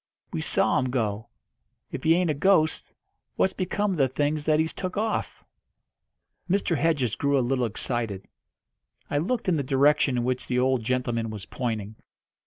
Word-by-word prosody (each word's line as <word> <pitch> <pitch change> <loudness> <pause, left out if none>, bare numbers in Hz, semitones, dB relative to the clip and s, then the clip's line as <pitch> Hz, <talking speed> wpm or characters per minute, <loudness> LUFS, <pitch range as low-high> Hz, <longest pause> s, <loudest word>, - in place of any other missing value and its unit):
We - - -2
saw - - +3
'em 130 - 0
go. 110 -3 -2 0.6
If - - -6
he 165 +1 +5
ain't 175 -2 +2
a - - 0
ghost, 160 +1 +2 0.4
what's 190 - +2
become 205 +2 -1
of 180 - -2
the 135 - +4
things 145 +3 -1
that 155 -1 +3
he's 160 0 0
took 185 +1 -5
off?" 220 +1 -2 1.1
Mr. 190 -2 +1
Hedges 145 -8 +1
grew 140 0 +1
a 130 - +1
little 125 0 +1
excited. 110 -3 -3 0.8
I 145 - +2
looked 215 +9 -2
in 175 -3 +2
the - - 0
direction 140 0 +3
in 120 - 0
which 125 +1 -2
the 125 - -1
old 130 -1 +2
gentleman 120 -1 -1
was 105 -3 -7
pointing. 110 -4 -4
135 Hz, 175 wpm, -26 LUFS, 120-160 Hz, 1.1 s, he